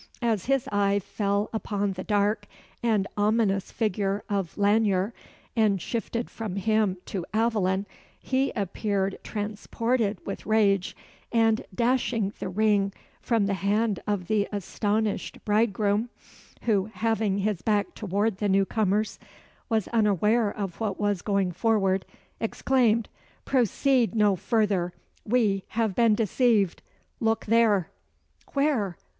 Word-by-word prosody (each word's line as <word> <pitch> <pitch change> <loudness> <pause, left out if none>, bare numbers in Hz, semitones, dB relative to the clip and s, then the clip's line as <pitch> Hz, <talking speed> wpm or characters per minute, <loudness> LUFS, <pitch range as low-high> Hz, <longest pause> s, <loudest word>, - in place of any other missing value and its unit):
As 220 -5 +1
his 270 -1 +1
eye 200 0 +2
fell 200 +1 -1
upon 205 -2 -1
the 185 0 -6
dark 210 +1 +1 0.3
and 220 -4 +2
ominous 205 -2 +1
figure 205 -2 -1
of 195 -4 -2
Lanyere, 205 0 +2 0.4
and 215 -4 +3
shifted 235 +3 -3
from 215 -5 -6
him 210 -1 +1
to 190 -4 -4
Aveline, 205 -4 +1 0.3
he 265 +1 0
appeared 195 0 -1
transported 215 +1 -1
with 195 - -6
rage; 200 -4 +2 0.3
and 225 -1 +3
dashing 235 -4 +1
the - - -3
ring 200 0 +2 0.3
from 225 -4 +1
the 200 - 0
hand 205 +1 0
of 205 -3 -1
the 205 +2 +1
astonished 205 +1 -2
bridegroom 210 +1 +1 0.5
(who, 205 -5 +2
having 220 -3 0
his 200 -2 -1
back 210 -2 0
toward 205 0 -1
the 205 0 0
newcomers, 200 +2 +1 0.5
was 220 -4 +1
unaware 215 0 +2
of 195 -4 -5
what 210 -4 -2
was 205 -3 0
going 200 -3 0
forward), 195 -1 +1 0.3
exclaimed 230 -1 +1 0.4
"Proceed 255 -1 +2
no 210 -2 +4
further! 195 -2 0 0.3
We 210 -4 +2
have 220 -3 -1
been 230 +1 +4
deceived! 215 -3 +2 0.4
Look 225 0 0
there!" 215 -5 +3 0.6
"Where? 270 - +1
210 Hz, 120 wpm, -26 LUFS, 195-225 Hz, 0.6 s, no